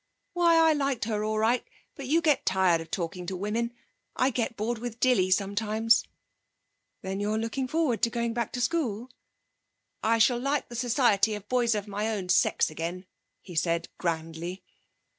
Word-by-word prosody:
'Why, 345 Hz, -1 st, +4 dB
I 325 Hz, -1 st, +5 dB
like 275 Hz, -4 st, -1 dB
her 210 Hz, -1 st, -1 dB
all 215 Hz, 0 st, -1 dB
right, 225 Hz, +3 st, +2 dB, 0.3 s
but 275 Hz, -3 st, -7 dB
you 325 Hz, +5 st, +3 dB
get 300 Hz, -4 st, +3 dB
tired 185 Hz, -3 st, +2 dB
of 165 Hz, -, -10 dB
talking 175 Hz, 0 st, -4 dB
to 190 Hz, -, -3 dB
women. 215 Hz, +5 st, -2 dB, 0.4 s
I 260 Hz, +2 st, +2 dB
get 230 Hz, -1 st, -2 dB
bored 225 Hz, +2 st, -2 dB
with 240 Hz, -1 st, -6 dB
Dilly 245 Hz, -8 st, +3 dB
sometimes.' 215 Hz, +4 st, +2 dB, 1.0 s
'Then 190 Hz, +1 st, -3 dB
you're 210 Hz, +1 st, 0 dB
looking 230 Hz, +4 st, -2 dB
forward 280 Hz, -7 st, 0 dB
to 230 Hz, -, +3 dB
going 235 Hz, 0 st, -2 dB
back 235 Hz, -2 st, -2 dB
to 250 Hz, -, -2 dB
school?' 245 Hz, -5 st, -1 dB, 0.9 s
'I 230 Hz, +1 st, +2 dB
shall 240 Hz, +2 st, +4 dB
like 275 Hz, +2 st, -1 dB
the 240 Hz, -, -8 dB
society 235 Hz, -3 st, +2 dB
of 210 Hz, -1 st, -9 dB
boys 240 Hz, -2 st, +2 dB
of 210 Hz, 0 st, -3 dB
my 205 Hz, +2 st, -2 dB
own 200 Hz, -5 st, -3 dB
sex 180 Hz, -, +3 dB
again,' 170 Hz, +4 st, -5 dB, 0.4 s
he 180 Hz, -, -11 dB
said 170 Hz, +1 st, 0 dB
grandly. 165 Hz, +2 st, -3 dB
220 Hz, 175 wpm, -28 LUFS, 190-245 Hz, 1.0 s, I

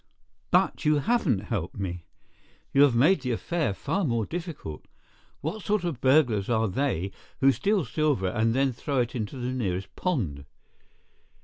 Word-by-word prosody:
"But -, -, +2 dB
you 150 Hz, 0 st, +4 dB
haven't 145 Hz, -, +1 dB
helped 100 Hz, -5 st, -3 dB
me. 90 Hz, -4 st, -4 dB, 0.7 s
You 140 Hz, -, +5 dB
have 140 Hz, -4 st, +6 dB
made 155 Hz, +8 st, +4 dB
the 125 Hz, -2 st, -1 dB
affair 160 Hz, +3 st, -1 dB
far 160 Hz, -, -2 dB
more 115 Hz, -7 st, 0 dB
difficult. 165 Hz, -, -6 dB, 0.5 s
What 170 Hz, +9 st, -3 dB
sort 210 Hz, -2 st, 0 dB
of 160 Hz, -9 st, -3 dB
burglars 130 Hz, -7 st, +3 dB
are 115 Hz, -1 st, +2 dB
they 100 Hz, -, -1 dB, 0.3 s
who 135 Hz, +1 st, +6 dB
steal 200 Hz, +2 st, +1 dB
silver 130 Hz, -7 st, 0 dB
and 115 Hz, +2 st, +1 dB
then 135 Hz, 0 st, +2 dB
throw 135 Hz, +2 st, -1 dB
it 120 Hz, -, -3 dB
into 115 Hz, +1 st, -4 dB
the 125 Hz, 0 st, -3 dB
nearest 95 Hz, -7 st, -3 dB
pond?" 90 Hz, -, -2 dB
125 Hz, 155 wpm, -27 LUFS, 105-155 Hz, 0.7 s, have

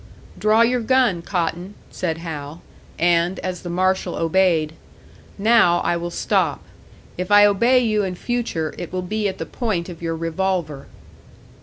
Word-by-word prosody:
"Draw 215 Hz, +2 st, +3 dB
your 245 Hz, +1 st, +1 dB
gun, 240 Hz, -7 st, +2 dB
Cotton," 175 Hz, +2 st, -3 dB, 0.2 s
said 165 Hz, -3 st, -3 dB
Hal; 160 Hz, -1 st, -7 dB, 0.3 s
and, 175 Hz, +2 st, +2 dB
as 180 Hz, -1 st, -4 dB
the 175 Hz, -, -7 dB
marshal 185 Hz, 0 st, 0 dB
obeyed, 165 Hz, -2 st, +1 dB, 0.6 s
"Now 210 Hz, -4 st, +4 dB
I 175 Hz, -, 0 dB
will 170 Hz, 0 st, -3 dB
stop. -, -, 0 dB, 0.6 s
If 180 Hz, +1 st, -3 dB
I 205 Hz, 0 st, +7 dB
obey 235 Hz, +5 st, +4 dB
you 215 Hz, -3 st, +1 dB
in 185 Hz, -2 st, -3 dB
future, 225 Hz, -8 st, -3 dB
it 175 Hz, -, -6 dB
will 185 Hz, 0 st, -3 dB
be 210 Hz, +3 st, -1 dB
at 190 Hz, -, -7 dB
the -, -, -5 dB
point 195 Hz, -8 st, -3 dB
of 170 Hz, -2 st, -10 dB
your 165 Hz, -1 st, -2 dB
revolver." 165 Hz, -3 st, -2 dB
180 Hz, 155 wpm, -21 LUFS, 170-210 Hz, 0.6 s, I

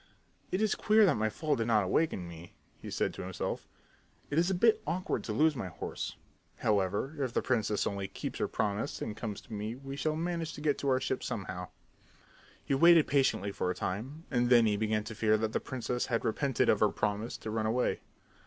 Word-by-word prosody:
"It 190 Hz, +4 st, +1 dB
is 215 Hz, -, +3 dB
queer 215 Hz, 0 st, +5 dB
that 180 Hz, -, +4 dB
my 110 Hz, 0 st, +1 dB
fall 150 Hz, +7 st, 0 dB
did 115 Hz, -3 st, -1 dB
not 110 Hz, -3 st, +4 dB
awaken 95 Hz, -, 0 dB
me," 85 Hz, 0 st, -11 dB, 0.2 s
he -, -, -9 dB
said -, -, -1 dB
to -, -, -7 dB
himself. 95 Hz, 0 st, -4 dB, 0.6 s
"It 150 Hz, -, +3 dB
is 175 Hz, +2 st, +2 dB
a 190 Hz, -, +1 dB
bit 225 Hz, +5 st, +4 dB
awkward 180 Hz, +2 st, -1 dB
to -, -, -3 dB
lose 155 Hz, +7 st, +3 dB
my 115 Hz, -7 st, -3 dB
horse. 85 Hz, -, -5 dB, 0.4 s
However, 105 Hz, +6 st, 0 dB
if 125 Hz, -3 st, -2 dB
the -, -, +1 dB
princess 110 Hz, -5 st, +1 dB
only 100 Hz, -1 st, -2 dB
keeps 100 Hz, -, -6 dB
her -, -, +1 dB
promise 105 Hz, 0 st, -2 dB
and 105 Hz, -, -4 dB
comes 110 Hz, -2 st, -5 dB
to 115 Hz, -, -12 dB
me 105 Hz, +2 st, -3 dB
we 135 Hz, +1 st, -7 dB
shall 155 Hz, +3 st, -1 dB
manage 165 Hz, -1 st, -2 dB
to -, -, -8 dB
get 150 Hz, -1 st, +1 dB
to 140 Hz, -, 0 dB
our 130 Hz, -1 st, +3 dB
ship 130 Hz, 0 st, -2 dB
somehow." 90 Hz, -3 st, -4 dB, 1.0 s
He -, -, 0 dB
waited 165 Hz, +3 st, +7 dB
very -, -, -12 dB
patiently 130 Hz, -8 st, +2 dB
for 90 Hz, -, -2 dB
a 90 Hz, -, -1 dB
time 125 Hz, -, -4 dB
and 120 Hz, -2 st, +2 dB
then 120 Hz, -2 st, +7 dB
he 105 Hz, -1 st, +2 dB
began 110 Hz, 0 st, 0 dB
to 110 Hz, -, -7 dB
fear 110 Hz, 0 st, +3 dB
that 110 Hz, 0 st, -2 dB
the -, -, +1 dB
princess 125 Hz, -1 st, -3 dB
had 115 Hz, -2 st, -1 dB
repented 135 Hz, +3 st, +1 dB
of -, -, +4 dB
her -, -, +4 dB
promise 105 Hz, +2 st, -2 dB
to 110 Hz, -, -6 dB
run 110 Hz, 0 st, 0 dB
away. 125 Hz, +3 st, +1 dB
115 Hz, 220 wpm, -31 LUFS, 105-145 Hz, 1.0 s, waited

